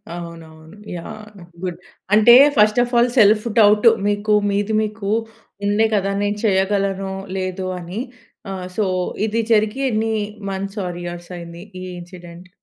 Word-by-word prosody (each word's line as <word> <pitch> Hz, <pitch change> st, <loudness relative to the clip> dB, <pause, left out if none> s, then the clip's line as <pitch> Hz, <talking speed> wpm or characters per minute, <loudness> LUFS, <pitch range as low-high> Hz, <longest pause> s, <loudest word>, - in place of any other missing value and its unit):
అవునవును. 165 Hz, 0 st, -11 dB, 0.2 s
Yeah! 215 Hz, +5 st, -8 dB, 0.4 s
Good 180 Hz, -2 st, -4 dB, 0.3 s
అంటే, 220 Hz, +3 st, +8 dB, 0.2 s
first 215 Hz, +2 st, +4 dB
of 245 Hz, +1 st, -6 dB
all, 240 Hz, +1 st, +4 dB
self 215 Hz, -1 st, +5 dB
doubt 210 Hz, +1 st, +5 dB, 0.2 s
మీకు 205 Hz, +1 st, 0 dB, 0.2 s
మీది 205 Hz, +2 st, -1 dB
మీకు 215 Hz, -1 st, -5 dB, 0.6 s
ఉండే 205 Hz, +2 st, +3 dB
కదా! 200 Hz, -1 st, 0 dB
నేను 205 Hz, 0 st, -1 dB
చేయగలనో, 195 Hz, -1 st, 0 dB, 0.2 s
లేదో 185 Hz, 0 st, -3 dB
అని? 180 Hz, +4 st, -6 dB, 0.5 s
ఆహ్, 185 Hz, -1 st, -5 dB
సో, 215 Hz, -, +2 dB, 0.4 s
ఇది 225 Hz, +1 st, 0 dB
జరిగి 215 Hz, +3 st, +2 dB
ఎన్ని 220 Hz, -1 st, 0 dB, 0.4 s
మంత్స్, 195 Hz, +2 st, -5 dB
ఆర్ 175 Hz, -1 st, -5 dB
ఇయర్స్ 175 Hz, 0 st, -7 dB
అయింది 170 Hz, 0 st, -9 dB, 0.2 s
ఈ -, -, -6 dB, 0.2 s
ఇన్సిడెంట్. 175 Hz, 0 st, -12 dB
200 Hz, 140 wpm, -20 LUFS, 180-215 Hz, 0.6 s, అంటే